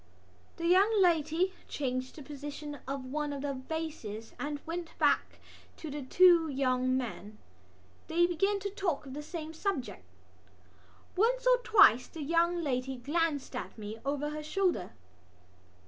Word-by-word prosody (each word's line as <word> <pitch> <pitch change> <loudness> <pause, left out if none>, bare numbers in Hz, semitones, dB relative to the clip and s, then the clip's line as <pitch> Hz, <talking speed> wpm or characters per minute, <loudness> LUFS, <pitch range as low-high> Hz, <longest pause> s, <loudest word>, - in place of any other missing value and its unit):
The 335 - -4
young 395 +5 +5
lady 340 +1 +3
changed 255 -2 -3
the 300 - -9
position 290 +1 -7
of 270 -1 -4
one 295 +3 -2
of 280 -1 -5
the 285 -1 -1
vases 260 -6 -5
and 290 0 -3
went 335 0 -5
back - - +2 0.4
to 315 - -7
the 295 +1 -4
two 340 +4 +5
young 255 -2 +1
men. 215 -4 -5 0.7
They 345 +2 +3
began 390 +4 +1
to 400 0 -3
talk 360 -8 -2
of 265 - -8
the 295 - -5
same 315 0 -6
subject. 320 - -3 1.1
Once 485 +5 +2
or - - +6
twice 320 - +5
the 320 - -7
young 340 +3 +2
lady 265 -2 -1
glanced 290 +1 -1
at 250 - -6
me 215 +1 -7
over 290 +2 -2
her 305 0 -5
shoulder. 335 - -1
300 Hz, 145 wpm, -31 LUFS, 265-345 Hz, 1.1 s, or